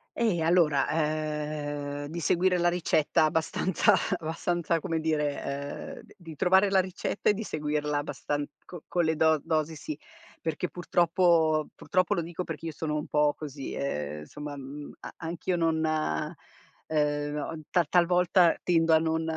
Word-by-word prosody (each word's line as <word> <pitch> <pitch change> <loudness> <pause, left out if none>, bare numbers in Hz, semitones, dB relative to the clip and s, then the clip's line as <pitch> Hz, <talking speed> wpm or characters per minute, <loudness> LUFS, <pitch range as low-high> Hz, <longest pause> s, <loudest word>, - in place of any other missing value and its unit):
Eh 210 -8 +1
allora, 165 -4 +3
ehm, 150 -2 -2
di 165 +4 -5
seguire 180 +3 +2
la 175 0 +4
ricetta 160 -3 +2
abbastanza 160 +3 +2 0.2
abbastanza 170 +1 -1
come 165 -1 -2
dire, 150 -2 0
ehm, 140 +1 -5
d - - -18
di 165 -4 -11
trovare 190 +5 +4
la 195 -1 +4
ricetta 185 +2 -2
e - - 0
di 210 - -5
seguirla 150 -5 -1
abbastan 145 0 -3 0.2
co 175 -4 -10
con 175 -2 +1
le 160 0 +1
do 160 -1 +3
dosi 160 -1 0
sì, 150 0 -6 0.4
perché 165 +2 -2
purtroppo 170 -3 +2
purtroppo 185 -2 +1
lo 170 - 0
dico 170 +2 -5
perché 165 -1 -6
io - - -3
sono 150 0 -3
un 150 - -3
po' 150 0 +3
così, 145 -3 -6
ehm, 75 - -3
somma, 145 - -7
mhmm, 140 +2 -8
a - - -9
anch'io 170 +2 -3
non 165 -2 +1
ehm, 150 -1 -2
ta 175 - +4
talvolta 175 0 +4
tendo 165 -2 +3
a 160 - +6
non 160 0 0
160 Hz, 155 wpm, -28 LUFS, 150-175 Hz, 0.4 s, a